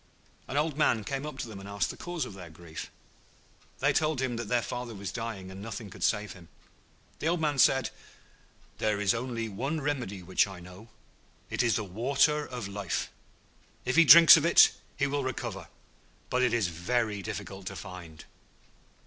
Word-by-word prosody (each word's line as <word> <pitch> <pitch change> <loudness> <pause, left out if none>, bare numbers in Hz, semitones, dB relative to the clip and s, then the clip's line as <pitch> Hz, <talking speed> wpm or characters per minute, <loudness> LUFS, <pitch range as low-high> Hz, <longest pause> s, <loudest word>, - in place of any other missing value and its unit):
An 140 - -3
old 150 0 0
man 115 -7 +3
came 135 +5 -4
up 150 - -8
to 125 - -4
them 105 -3 -9
and 100 +1 -10
asked 100 -2 -1
the - - -10
cause 175 -2 -4
of - - -9
their 90 -3 -10
grief. 80 0 -9 0.9
They - - +2
told 155 -3 +1
him 130 -2 -1
that 115 -2 -4
their 120 +1 +1
father 120 -2 -5
was 100 -1 -5
dying, 110 -5 -5
and 95 +1 -9
nothing 110 -1 -7
could - - -12
save 105 -1 0
him. 90 -4 -15 0.7
The 155 - -2
old 175 +1 +1
man 150 -3 0
said, 135 0 +4 0.9
'There 105 -1 0
is 100 -2 +2
only 115 -1 -3
one 135 +10 -3
remedy 125 -10 -3
which 95 +3 +2
I 95 -2 -9
know; 90 +6 -13 0.6
it - - 0
is 120 -2 +2
the 110 - -1
Water 135 +9 +1
of 125 -5 -6
Life. 100 -2 -3 0.7
If 130 - 0
he 165 - +8
drinks 165 +1 +10
of 155 - 0
it, 170 - +7 0.3
he 140 - +1
will 140 0 -1
recover, 120 -8 -5 0.6
but 125 - +2
it 125 -2 +3
is 115 -3 +1
very 105 +5 -1
difficult 95 -1 -7
to - - -5
find.' 85 -4 -10
115 Hz, 190 wpm, -29 LUFS, 95-135 Hz, 0.9 s, drinks